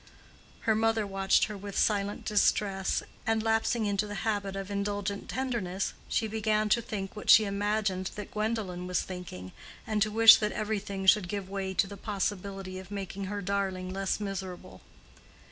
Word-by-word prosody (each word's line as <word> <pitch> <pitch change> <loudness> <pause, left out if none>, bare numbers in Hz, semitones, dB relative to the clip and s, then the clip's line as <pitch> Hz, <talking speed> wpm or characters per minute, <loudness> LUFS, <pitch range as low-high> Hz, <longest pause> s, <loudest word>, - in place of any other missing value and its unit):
Her 220 - +2
mother 225 0 +2
watched 195 -1 +2
her 210 - -2
with 200 0 -7
silent 205 -1 +1
distress; 200 -2 +1 0.2
and, 225 -1 +2
lapsing 225 0 +1
into 205 0 0
the 205 - -6
habit 200 -3 -1
of 195 0 -5
indulgent 200 0 -2
tenderness, 230 -8 -2 0.2
she 225 - +1
began 215 0 0
to 235 - +3
think 205 -5 -5
what 210 - -7
she 220 - +9
imagined 200 -2 -1
that 210 - -7
Gwendolen 210 -5 -2
was 180 - 0
thinking, 175 - -8 0.3
and 215 -1 -1
to 215 - +3
wish 225 +1 +9
that 210 -1 -1
everything 200 -2 -3
should 190 -1 +5
give 195 -1 -4
way 190 -1 -3
to 190 - +3
the 200 +1 -9
possibility 195 -2 -3
of 190 0 -11
making 195 -1 -5
her 205 +1 -4
darling 190 -1 -2
less 195 +1 -1
miserable. 190 - -6
200 Hz, 165 wpm, -29 LUFS, 195-215 Hz, 0.3 s, she